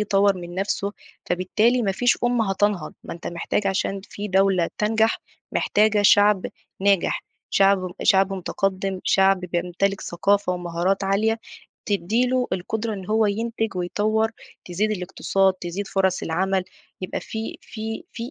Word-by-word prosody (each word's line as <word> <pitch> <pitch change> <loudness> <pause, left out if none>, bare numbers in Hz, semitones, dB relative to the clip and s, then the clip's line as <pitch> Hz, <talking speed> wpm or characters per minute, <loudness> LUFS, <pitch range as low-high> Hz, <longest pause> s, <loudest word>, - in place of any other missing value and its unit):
يطوّر 200 -1 +3
من 175 -1 -8
نفسه، 200 +1 -1 0.3
فبالتالي 215 +7 +2
ما 195 -2 +1
فيش 245 +5 +2
أُمّة 240 -4 +2
هتنهض. 195 -4 0
ما - - -6
أنت 170 - -9
محتاج 175 +4 -2
عشان 195 0 -1
في 205 +1 -6
دولة 190 -2 +3
تنجح، 220 +1 +2 0.3
محتاجة 210 0 +2
شعب 205 -1 +5 0.3
ناجح، 195 -2 +2 0.3
شعب 195 0 +4 0.2
شعب 195 0 +4
مُتقدِّم، 190 0 -2
شعب 195 -1 +4
بيمتلك 180 +2 -1
ثقافة 200 +2 +1
ومهارات 175 +2 -1
عالية 215 +4 +1 0.5
تدّي 210 +4 +1
له 250 0 +1
القدرة 215 +4 -2
إن 190 -2 -7
هو 220 0 +2
ينتج 225 0 -2
ويطوّر، 215 +5 0 0.3
تزيد 195 +5 -1
الاقتصاد، 190 0 +1
تزيد 185 +2 -5
فرص 190 -1 +1
العمل، 190 +3 0 0.4
يبقى 185 - -4
في 220 0 -6
في 220 0 -6
في 235 +2 -6
195 Hz, 140 wpm, -23 LUFS, 185-215 Hz, 0.5 s, شعب